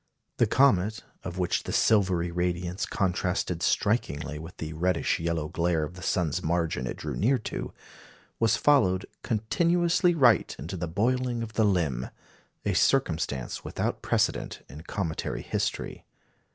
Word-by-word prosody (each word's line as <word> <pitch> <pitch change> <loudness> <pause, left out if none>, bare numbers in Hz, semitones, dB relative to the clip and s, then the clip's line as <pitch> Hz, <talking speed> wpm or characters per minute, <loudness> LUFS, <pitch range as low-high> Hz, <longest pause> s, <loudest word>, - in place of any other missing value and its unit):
The 120 - +4
comet, 110 -4 +3 0.2
of 90 0 -6
which 90 -2 0
the - - -6
silvery 95 -5 +3
radiance 90 +1 -1
contrasted 90 -2 -1
strikingly 75 -10 0
with 80 +3 -10
the 80 0 -5
reddish 90 +2 +1
yellow 80 -2 -1
glare 85 -1 0
of 75 - -5
the 90 - -11
sun's 85 -5 0
margin 80 -6 -1
it - - -4
drew - - -4
near 130 +6 +3
to, 110 - -5 0.7
was 115 0 +3
followed 95 -11 +3 0.2
"continuously 170 - +2
right 120 - +4
into 85 +5 -6
the 85 -1 -3
boiling 120 +6 0
of 110 -1 -7
the 110 0 +3
limb" 80 -11 0 0.6
a 100 - +1
circumstance 80 - +1
without - - -2
precedent - - 0
in 75 +4 -10
cometary 85 -1 -3
history. - - -3
90 Hz, 140 wpm, -27 LUFS, 85-110 Hz, 0.7 s, The